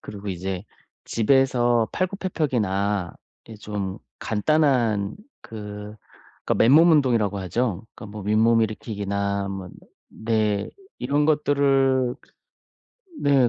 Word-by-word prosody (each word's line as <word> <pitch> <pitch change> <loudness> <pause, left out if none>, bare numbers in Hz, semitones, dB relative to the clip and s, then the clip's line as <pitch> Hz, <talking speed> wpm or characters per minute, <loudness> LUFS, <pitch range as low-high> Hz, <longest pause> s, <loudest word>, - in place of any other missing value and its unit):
그리고 100 0 -8
이제 95 0 -4 0.4
집에서 120 -1 +2
팔굽혀펴기나 110 - -1 0.3
이렇게 110 -2 -11
좀 100 -2 -4 0.2
간단한 115 -4 +1 0.3
그 105 -1 -8 0.5
그러니까 - - +1
맨몸 150 +9 +6
운동이라고 120 -9 +2
하죠. 105 +1 -1
그러니까 110 - -9
뭐 105 - -6
윗몸일으키기나 105 -2 0
뭐 95 -2 -6 0.4
네 110 -2 -1 0.3
이런 145 +4 +1
것들을 135 -4 +2 1.1
네 140 -4 +4
110 Hz, 245 characters per minute, -24 LUFS, 100-135 Hz, 1.1 s, 맨몸